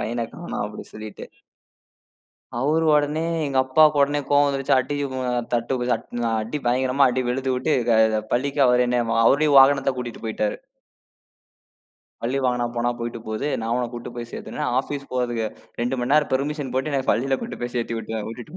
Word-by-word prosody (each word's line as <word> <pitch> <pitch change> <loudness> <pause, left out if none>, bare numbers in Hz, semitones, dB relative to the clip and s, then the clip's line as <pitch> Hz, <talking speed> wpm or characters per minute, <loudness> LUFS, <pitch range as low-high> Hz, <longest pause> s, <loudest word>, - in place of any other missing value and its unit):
பையன 115 0 -2
காணோம்" 175 -9 -5
அப்டி 105 0 -8
சொல்லிட்டு. 110 0 -8 1.3
அவரு 155 +5 +1
ஒடனே 150 +2 +1 0.2
எங்க 135 -2 0
அப்பாக்கு 150 +3 +4
ஒடனே 145 +1 +1
கோவம் 145 0 +4
வந்துருச்சு. 135 -1 +1
அடி 130 +3 -2
ஒ - - -7 0.4
தட்டு 120 +1 -1
தட் - - -2 0.4
அடி 115 +7 -4
பயங்கரமா 130 +2 +3
அடி 130 +1 -1
வெளுத்து 130 +1 0
விட்டு 130 +5 0 0.2
க 110 -1 +4
பள்ளிக்கு 140 +3 0
அவரே 125 0 +4
என்னை 125 0 +2 0.2
அவருடைய 145 +5 +4
வாகனத்த 135 0 +5
கூட்டிட்டு 120 -2 -6
போயிட்டாரு. 105 -1 -1 1.7
பள்ளி 125 +4 -1
வாகனம் 120 -1 0
போனா 120 +1 +1
போயிட்டு 115 -1 -5
போது. 110 +6 -3 0.2
நான் 115 - -2
உன்னக் 125 -1 -2
கூட்டிட்டு 120 0 -7
போய்ச் 120 -1 -7
சேர்த்துர்றேன் - - -4
ஆஃபீஸ் 140 -1 -7
போறதுக்கு 120 -3 -1 0.4
2 125 +2 -1
மணி 125 +3 -1
நேரம் 150 -1 +3
பெர்மிஷன் 145 0 -2
போட்டு, 135 +3 0
என்னைப் 135 -2 +1
பள்ளியில 135 +2 0
கொண்டு - - -6
போய்ச் 120 0 -4
சேர்த்துவிட்டு 115 -1 -3
விட்டுட்டு 120 +9 -9
125 Hz, 165 wpm, -23 LUFS, 120-140 Hz, 1.7 s, வாகனத்த